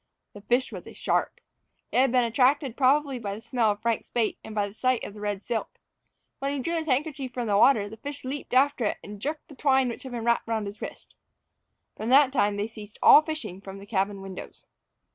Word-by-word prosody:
The 205 - -11
fish 245 +5 +1
was - - -8
a - - -10
shark. - - -1 0.5
It - - 0
had 260 -1 +4
been 250 -1 +4
attracted 255 +2 +2
probably 275 0 +2
by 200 -3 -4
the 215 - -10
smell 235 -2 +1
of 205 +1 -2
Frank's 230 -2 -1
bait, 230 -3 -1
and 220 - -9
by 205 -1 +1
the 200 - -11
sight 255 +2 0
of - - -6
the 210 - -11
red 205 -1 -3
silk. 235 -2 -3 0.6
When 275 +1 -1
he 285 - -2
drew 335 +6 -2
his 325 -1 -2
handkerchief 270 -2 -1
from 245 -2 -2
the 205 -2 +1
water, 210 -1 +5
the 220 +2 -10
fish 285 +3 -7
leaped 265 -1 -4
after 275 -1 +3
it, - - 0
and 205 0 -9
jerked 300 +4 -4
the 295 - -13
twine 265 -2 +3
which 235 - -6
had 260 - -8
been 235 -2 -4
wrapped 235 -1 +1
around 220 -2 -1
his 200 +1 -8
wrist. - - -8 0.8
From 220 - -4
that 270 0 +6
time 205 -6 +2
they 205 - -1
ceased 215 -1 -11
all - - +9
fishing 310 - -6
from 195 0 -9
the 200 - -11
cabin 200 -1 -1
windows. 190 -1 -9
235 Hz, 235 wpm, -26 LUFS, 210-270 Hz, 0.8 s, all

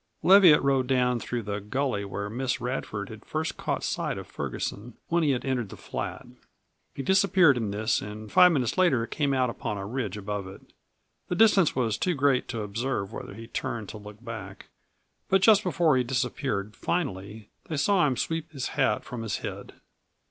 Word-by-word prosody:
Leviatt 185 -7 +7
rode 135 -2 +2
down 125 -2 +2
through 120 0 -4
the 100 0 -4
gully 125 0 -1
where 100 +1 -4
Miss 125 +4 -2
Radford 110 -5 -4
had 110 -1 -10
first 155 +1 -3
caught - - -3
sight - - -2
of - - -6
Ferguson 110 +4 -5
when 170 0 +2
he 155 - +2
had 130 -1 0
entered 125 -6 -1
the - - -10
flat. - - -5 0.7
He 135 - -4
disappeared 190 -3 +5
in 115 -4 -2
this 110 +3 0
and 105 0 -8
five 180 0 +7
minutes 135 +1 0
later 135 -11 +3
came 145 +2 -1
out 130 -3 +1
upon 105 -2 -4
a 100 - -5
ridge 110 -3 -3
above 105 -1 -4
it. 95 - -11 0.7
The 180 - -2
distance 200 -5 +4
was 115 -4 0
too 180 -2 +1
great 140 -2 +2
to 115 -2 -4
observe 110 0 -3
whether 100 - -7
he 115 +2 -9
turned 115 -2 -4
to - - -7
look 105 +3 -12
back. 105 -4 -8 0.6
But 190 0 +3
just 210 -1 +7
before 170 -6 +2
he 130 - +2
disappeared 120 -4 -2
finally 110 - -3 0.2
they 155 - -2
saw 180 +1 +3
him 130 -3 -1
sweep 165 +3 -3
his 135 -4 -4
hat 135 -3 +1
from 125 -2 -6
his 110 -4 -2
head. - - -7
125 Hz, 190 wpm, -27 LUFS, 105-150 Hz, 0.7 s, Leviatt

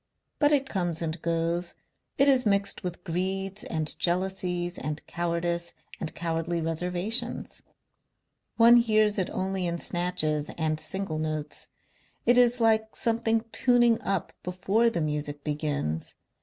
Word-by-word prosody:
But 290 0 +4
it 275 -2 +3
comes 175 -7 -2
and 160 0 -3
goes, 170 +1 -1 0.4
it 275 - +5
is 265 -2 +5
mixed 200 -2 +1
with 180 -1 -5
greeds 190 +3 -2
and 155 -2 -2
jealousies 180 -1 -1
and 150 0 -4
cowardice 170 0 -2 0.2
and 160 - -5
cowardly 170 0 -2
reservations. 180 +7 -1 1.0
One 235 +1 +8
hears 215 -2 +3
it 185 - 0
only 190 -1 -2
in 170 0 -2
snatches 155 -4 -1
and 155 -1 0
single 160 0 -3
notes. 155 -1 -3 0.6
It 240 - +5
is 245 0 +5
like 220 -1 +2
something 225 -1 +1
tuning 240 -2 +3
up 195 -3 -2
before 190 +6 +1
the 170 -7 -2
Music 150 -1 -3
begins.... 145 - -2
180 Hz, 130 wpm, -27 LUFS, 165-220 Hz, 1.0 s, One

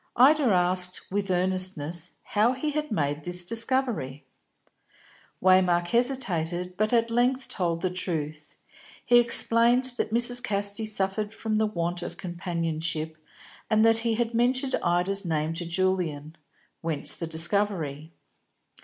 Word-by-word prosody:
Ida 285 +4 +5
asked, 180 -3 +1
with 200 0 -2
earnestness, 180 -2 -1
how 220 +4 +1
he 300 +4 -3
had 300 -2 -3
made 145 -5 -1
this 180 +1 -1
discovery. 225 - -1 1.2
Waymark 180 -2 +3
hesitated, 180 -9 -1
but 215 +2 0
at 230 -1 +2
length 250 +2 +1
told 170 -2 -2
the 185 - 0
truth. 155 -4 -4 0.5
He 240 0 +6
explained 240 +2 +4
that - - -2
Mrs. 240 +1 +3
Casti 205 -1 -2
suffered 210 +1 -1
from 215 -1 -1
the 220 - +2
want 175 -3 -2
of 175 0 -7
companionship, 165 -3 -3 0.5
and 220 0 +4
that 225 0 +4
he 225 0 -1
had 235 0 -1
mentioned 255 +3 +1
Ida's 180 +3 0
name 160 -2 -1
to 170 0 -4
Julian; 170 -4 -1 0.5
whence 160 -3 -2
the 165 - -5
discovery. 160 -3 0
185 Hz, 130 wpm, -26 LUFS, 170-230 Hz, 1.2 s, He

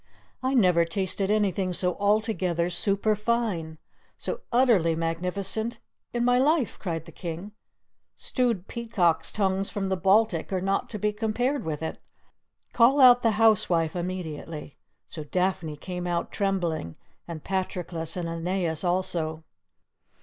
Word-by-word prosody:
"I 260 +1 0
never 180 -7 +5
tasted 190 +2 0
anything 195 -3 +1
so 180 0 +1
altogether 195 -5 +1
super 200 +4 +1
fine, 210 -8 -1 0.4
so - - -2
utterly 230 -10 +4
magnificent 185 +7 -2 0.3
in 240 0 0
my 245 0 +4
life," 290 -2 +1
cried 165 -4 -4
the - - -12
King; 175 +4 -6 0.6
"stewed 235 -8 0
peacocks' 175 -9 0
tongues 195 -1 0
from 195 -2 -3
the 190 - +1
Baltic 190 -1 +2
are 190 - 0
not 195 +2 -1
to 215 - -5
be 210 +1 0
compared 240 +6 -1
with 160 -1 -4
it! 160 - -4 0.7
Call 250 +5 +5
out 245 -2 +8
the 225 -2 +2
housewife 185 -8 +3
immediately!" 165 -4 -5 0.3
So 155 - -7
Daphne 180 -1 -1
came 180 +2 -5
out 170 -1 -2
trembling, 175 - -1 0.3
and 165 -3 -7
Patroclus 180 -3 -3
and 175 -2 -2
Aeneas 165 0 -2
also. 170 -3 -1
185 Hz, 135 wpm, -26 LUFS, 170-215 Hz, 0.7 s, out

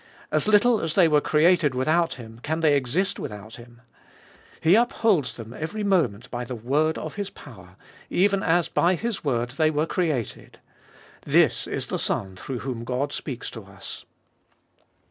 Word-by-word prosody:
As - - +1
little 215 +2 +4
as 160 -1 -2
they 180 -4 +6
were 150 -2 +3
created 155 -2 +3
without 160 +6 +1
Him, 115 -2 -11
can 160 +4 -2
they 150 -3 +4
exist 145 +9 0
without 105 +1 -7
Him? 120 0 -15 0.8
He 160 +2 +4
upholds 215 - +2
them 115 0 -9
every 185 +10 -4
moment 155 - +1
by 120 0 -3
the 125 +1 -5
word 145 +8 0
of 155 +5 -6
His 200 -1 -3
power, 95 - -14 0.3
even 195 +1 +2
as 170 -1 +2
by 180 +2 +2
His 230 +2 -3
word 120 -4 -1
they 155 +4 +2
were 155 0 0
created. 160 - -3 0.7
This - - +3
is - - -3
the - - -3
Son 95 -2 -2
through 125 +6 -6
whom 125 -3 -4
God 130 +4 -2
speaks 130 -5 -5
to 115 -4 -9
us. 100 -1 -9
150 Hz, 165 wpm, -25 LUFS, 120-175 Hz, 0.8 s, they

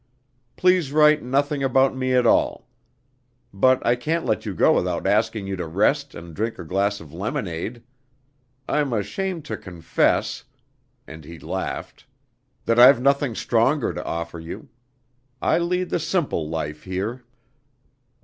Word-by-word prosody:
Please 180 -6 +2
write 150 0 +5
nothing 140 +3 0
about 135 0 +3
me 130 0 -1
at 125 -1 +3
all. - - +2 0.9
But 130 +6 +3
I 120 - +4
can't 160 +7 -2
let 110 -5 -1
you - - -4
go - - +4
without - - -1
asking 105 -3 +1
you 95 0 -3
to 85 -2 -4
rest 130 - +1
and 85 0 -10
drink 115 +2 -2
a - - -7
glass 100 +4 0
of 75 -2 -13
lemonade. 105 - -4 0.8
I'm 145 -4 0
ashamed 155 - -3
to - - -4
confess" 85 -3 -1 0.6
and 80 -1 -11
he 85 +3 -10
laughed - - -6 0.6
"that 115 +1 +2
I've 125 +1 +8
nothing 140 -2 +1
stronger 120 +5 +1
to - - -5
offer 85 0 -5
you. 80 +1 -9 0.7
I - - +2
lead 180 +1 -1
the - - +1
simple 150 - -1
life 75 -2 -4
here!" 100 +7 -4
120 Hz, 145 wpm, -23 LUFS, 95-145 Hz, 0.9 s, I've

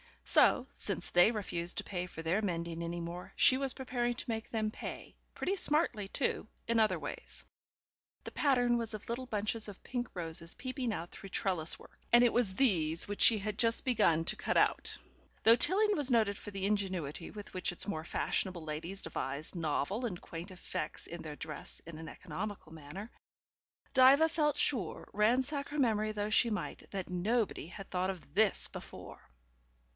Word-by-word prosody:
So, - - +5
since - - -3
they 175 +4 +6
refused 180 -6 -2
to - - 0
pay 180 -2 -4
for 165 - -8
their 175 +6 +1
mending 170 -4 -3
any 170 +1 -3
more 170 +2 -7
she 260 - +6
was 270 -1 0
preparing 245 -2 -1
to 245 - -7
make 225 -1 -3
them 215 -2 -1
pay, - - -7 0.2
pretty 390 - -1
smartly 300 - +3
too, 200 - -1 0.2
in 230 0 +2
other 215 -5 +3
ways. 145 -2 -7 0.8
The - - -7
pattern 245 -4 +3
was 230 -2 -3
of 210 - -9
little 245 +2 -3
bunches 215 0 0
of 205 -2 -10
pink 245 -1 -3
roses 165 -1 -1
peeping 255 -2 -3
out 170 -1 -5
through 195 - -10
trellis 180 -5 +1
work, - - -17
and 240 +1 +8
it 240 - +5
was 220 -6 +1
these 170 - +2
which 205 0 -4
she 225 - +6
had 210 +1 -4
just 230 -1 +3
begun 170 -10 +3
to - - 0
cut - - -1
out. - - +2 0.5
Though 230 +1 +7
Tilling 415 - +4
was 285 -3 +4
noted 220 -4 +3
for - - -8
the 195 -1 -3
ingenuity 185 -7 -2
with 205 -1 -10
which 185 - -1
its - - -1
more 160 -6 -3
fashionable 180 0 -1
ladies 165 +5 -4
devised 150 0 -3
novel 170 - -1
and 180 -7 -4
quaint 170 +3 -8
effects 180 -4 -5
in 170 0 -7
the 155 -2 -7
dress 150 0 -6
in 165 -1 -9
an 160 - -8
economical 185 0 -6
manner, 165 +8 -9 0.8
Diva 275 +5 +7
felt 300 -3 +1
sure, 225 - +1
ransack 260 +7 +1
her 295 - -5
memory 215 -5 +2
though 210 0 -2
she 235 - +5
might, 210 - -4
that 195 -2 -5
nobody 200 0 0
had 195 +2 -10
thought 185 +1 0
of 185 -3 -7
THIS 210 0 +4
before. - - -9
205 Hz, 180 wpm, -33 LUFS, 170-240 Hz, 0.8 s, and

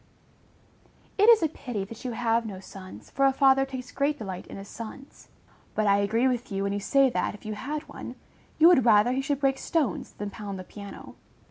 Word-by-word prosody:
_ - - +5
It 440 - +7
is 450 -6 +7
a - - +4
pity 245 -9 -5
that 225 +4 -11
you 250 -2 -3
have 230 0 +1
no 200 -4 -7
sons, 190 0 -12
for 275 0 +3
a - - +4
father 270 0 +4
takes 255 -1 -7
great 285 +1 0
delight 190 -7 -6
in - - -9
his 195 0 -9
sons; 235 +6 -10 0.5
but 215 - +1
I 200 0 +4
agree 225 +5 +2
with 250 -2 -2
you, 195 0 -1
when 200 0 -1
you 205 - -1
say 275 +6 +3
that, 220 - -1
if 210 - -16
you 215 - -3
had 295 +8 -4
one, - - -8 0.4
you 320 - +7
would 345 -8 +6
rather 220 0 +5
he 260 +1 0
should 280 0 -2
break 270 -1 +2
stones 295 - -1
than 205 0 -6
pound 200 -1 -6
the 185 - -7
piano. 200 +1 -11
235 Hz, 225 wpm, -27 LUFS, 205-275 Hz, 0.5 s, It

